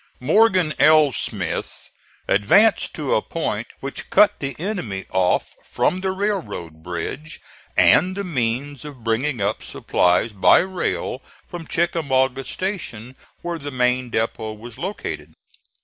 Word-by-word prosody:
Morgan 185 - +3
L. 155 -2 +6
Smith - - -4 0.4
advanced 200 - +3
to 150 -4 -1
a - - +3
point 115 -8 -3
which 140 0 -6
cut 210 - +5
the 135 -2 -3
enemy 150 - -4
off 95 -1 +1
from 185 - 0
the 190 - -1
railroad 190 - -3
bridge 90 - -6 0.4
and 185 +2 +5
the 200 - -2
means 135 -3 -2
of 140 -5 -10
bringing 115 +2 0
up 100 +2 -1
supplies 90 +5 +1
by 95 - +6
rail 185 0 -2 0.3
from 175 -3 -8
Chickamauga 135 -6 +1
Station, 130 - -5 0.3
where 170 -1 -3
the 145 - -6
main 125 -1 0
depot 110 -1 -2
was 115 +3 -11
located. 190 +6 -5
140 Hz, 130 wpm, -22 LUFS, 115-175 Hz, 0.4 s, L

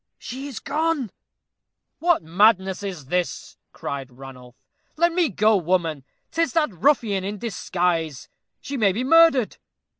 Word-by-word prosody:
She 265 +3 -7
is 275 - -8
gone!" 300 - -1 0.9
"What 345 - +2
madness 190 +3 +3
is 185 -8 -6
this?" 180 +5 -3
cried 135 -2 -6
Ranulph. 125 -1 -12 0.4
"Let 340 +1 +3
me 345 -2 +2
go, 215 +1 +3
woman 170 -5 -1 0.3
'tis 330 0 0
that 310 - +1
ruffian 205 - +1
in 205 +2 -4
disguise 175 - -2 0.3
she 275 +1 -5
may 200 -5 +3
be 235 +6 -2
murdered." 320 -5 +4
205 Hz, 130 wpm, -23 LUFS, 170-280 Hz, 0.9 s, murdered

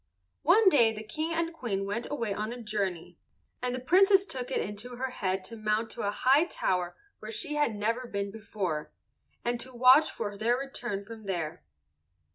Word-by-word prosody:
One 395 +7 +5
day 235 -9 +5
the 215 0 -7
King 310 +10 -3
and 330 0 -1
Queen 205 -10 -2
went 205 +4 -3
away 230 -8 -1
on 215 +3 -3
a 245 - -6
journey, 190 -6 -3 0.4
and 250 0 -1
the - - -3
Princess 390 +8 +5
took 255 -8 -4
it - - 0
into 210 +5 -5
her 260 +1 -3
head 190 -5 -2
to 230 - -8
mount 215 +1 -1
to - - -6
a 200 - 0
high 265 +9 +4
tower 180 - -1 0.2
where 215 - -8
she 220 +7 -3
had 295 -7 +1
never 230 +4 -1
been 200 -2 -3
before, 195 -7 -4 0.5
and 240 0 0
to 260 - -4
watch 255 +5 +7
for 205 0 -4
their 230 +4 +1
return 240 -6 -4
from 220 0 -10
there. 165 - -3
230 Hz, 190 wpm, -29 LUFS, 200-260 Hz, 0.5 s, watch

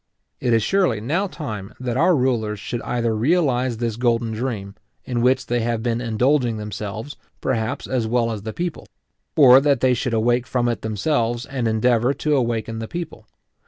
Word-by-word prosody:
It 125 - 0
is 115 -2 +3
surely 180 - +2
now 165 - -1
time 110 - -7
that 125 -2 -3
our 170 +6 +4
rulers 115 -6 0
should 115 +3 -4
either 115 -2 -1
realize 130 -2 +1
this 115 -2 -2
golden 120 -2 +1
dream, 110 -4 -4 0.3
in 120 -2 -1
which 125 +2 +2
they 120 0 0
have 115 -1 -1
been 120 -1 0
indulging 120 +1 +1
themselves, 105 +5 -6 0.2
perhaps, 115 -4 -2
as 125 -4 -1
well 115 0 +1
as 110 -2 -4
the 110 +2 -5
people; 170 +5 -4 0.5
or 135 -3 +8
that 140 -1 +2
they 130 -1 +3
should 120 0 -1
awake 120 +2 +1
from 125 -2 0
it 120 -2 -1
themselves, 115 +2 -1
and 130 -4 -2
endeavour 120 +3 +2
to 150 -1 0
awaken 115 -3 -1
the 115 - -5
people. 160 -10 -7
120 Hz, 180 wpm, -22 LUFS, 110-130 Hz, 0.5 s, or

